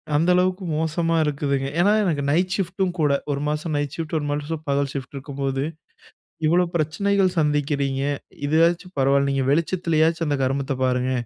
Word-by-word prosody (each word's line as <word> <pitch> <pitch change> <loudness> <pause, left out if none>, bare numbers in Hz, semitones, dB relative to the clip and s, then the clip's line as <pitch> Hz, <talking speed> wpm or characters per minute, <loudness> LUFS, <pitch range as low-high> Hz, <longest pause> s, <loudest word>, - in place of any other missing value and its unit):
அந்த 165 +4 +2
அளவுக்கு 185 +1 +1
மோசமா 165 +1 0
இருக்குதுங்க. 140 -2 -1
ஏன்னா, 195 +4 +4
எனக்கு 155 -7 0
நைட் 180 +4 +1
ஷிஃப்ட்டும் 185 -1 -1
கூட. 150 -2 +3 0.2
ஒரு 140 0 -2
மாதம் 150 +1 -2
நைட் 145 -1 -2
ஷிஃப்ட் 165 -1 -4
ஒரு 145 - -4
மாசம் 150 +2 -3
பகல் 140 0 +1
ஷிஃப்ட் 135 0 -6
இருக்கும்போது, 135 -1 -3 0.8
இவ்ளோ 175 +3 +4
பிரச்சனைகள் 185 +4 +1
சந்திக்கிறீங்க! 145 -2 0 0.4
இதுவாச்சும் 170 +4 +2
பரவாயில்ல. 140 +1 +3
நீங்க 135 -1 0
வெளிச்சத்திலேயாச்சும் 165 0 +1
அந்த 145 - +1
கருமத்த 135 +1 0
பாருங்க! 125 0 +1
150 Hz, 150 wpm, -23 LUFS, 140-170 Hz, 0.8 s, ஏன்னா